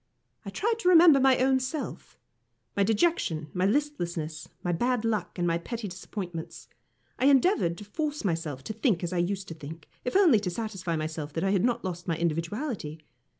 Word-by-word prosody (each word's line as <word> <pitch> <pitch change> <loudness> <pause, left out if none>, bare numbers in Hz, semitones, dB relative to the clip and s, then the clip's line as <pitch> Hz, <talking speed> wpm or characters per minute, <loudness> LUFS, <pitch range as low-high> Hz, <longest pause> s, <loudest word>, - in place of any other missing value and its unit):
I - - -6
tried 455 +1 -1
to 365 - +2
remember 330 -5 +8
my 265 -1 +5
own 260 +1 +3
self, 260 +4 -5 0.6
my 200 - +1
dejection, 200 - +1
my 185 +1 +2
listlessness, 175 - -2
my 175 - 0
bad 240 +6 0
luck, 215 -6 -1
and 175 - 0
my 170 0 +1
petty 230 +4 -5
disappointments. 180 -2 -7 0.5
I 255 - +2
endeavoured 275 - +3
to 210 - -9
force 300 +5 -3
myself 160 -7 -2
to 220 - -5
think 215 - +1
as 175 +1 -2
I 175 - 0
used 195 +2 -1
to - - -5
think, 160 0 -10 0.2
if 250 - -3
only 345 - +6
to 200 -3 -2
satisfy 190 -3 -3
myself 155 -1 -4
that 165 - -2
I 195 - +2
had 195 -3 +2
not 240 -4 0
lost 175 -1 -5
my 165 -2 0
individuality. 170 - -2
195 Hz, 190 wpm, -28 LUFS, 165-255 Hz, 0.6 s, remember